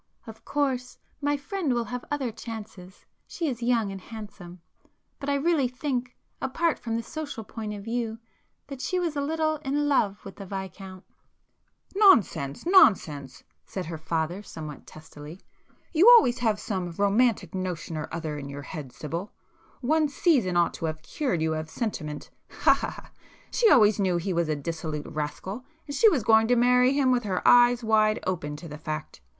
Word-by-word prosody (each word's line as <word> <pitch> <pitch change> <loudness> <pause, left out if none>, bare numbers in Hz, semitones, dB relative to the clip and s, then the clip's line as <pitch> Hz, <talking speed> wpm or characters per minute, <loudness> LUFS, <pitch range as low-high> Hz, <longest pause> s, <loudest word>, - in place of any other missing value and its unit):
"Of 220 -2 -11
course 265 -4 -1 0.2
my 290 0 +1
friend 290 -2 -2
will 240 - 0
have 245 +2 -6
other 275 -5 -2
chances,—she 215 - -8
is 245 -4 -3
young 235 -4 +1
and 195 -1 -7
handsome—but 205 +4 -11
I 285 - +2
really 285 -2 +2
think, 250 -1 -3 0.3
apart 330 +5 0
from 230 -1 -3
the 230 - -2
social 290 -7 -6
point 215 0 -6
of 200 - -8
view, 230 0 -3 0.5
that 275 -2 -8
she 365 +5 -1
was 335 -4 -2
a 285 - 0
little 310 +1 0
in 290 0 -1
love 205 -8 +1
with 195 - -10
the 200 - -8
Viscount——" 190 0 -7 0.9
[p 390 - -4
134]"Nonsense! 220 - +4
nonsense!" 170 - +3 0.2
said 185 - -5
her 165 0 -5
father 160 +4 -2
somewhat 155 -7 -9
testily. 155 +1 -11 0.5
"You 355 +8 +7
always 245 - +2
have 220 -3 +1
some 185 -4 -3
romantic 200 -1 +2
notion 180 -3 -4
or 155 -1 -4
other 160 -3 -4
in 140 -1 -7
your 140 0 -7
head 145 -5 -7
Sibyl,—one 205 - -3
'season' 260 - +2
ought 170 -1 +3
to - - -5
have 155 0 -4
cured 185 - -1
you 160 0 +1
of 155 0 -4
sentiment—ha 155 - -1
ha - - -3
ha! - - -12 0.4
She 465 -3 +4
always 215 - +5
knew 185 -3 +2
he 180 +2 -2
was 170 -2 0
a 155 - +1
dissolute 155 0 -4
rascal, 155 - -5 0.2
and 285 - -6
she 445 - +6
was 280 - 0
going 220 +1 +5
to 245 - +4
marry 250 +2 +4
him 275 -2 +3
with 250 -1 +2
her 195 -5 -2
eyes 245 0 +6
wide 215 -1 +3
open 160 -5 -2
to 165 +3 -9
the 150 -1 -9
fact. 155 - -6
215 Hz, 175 wpm, -26 LUFS, 170-260 Hz, 0.9 s, You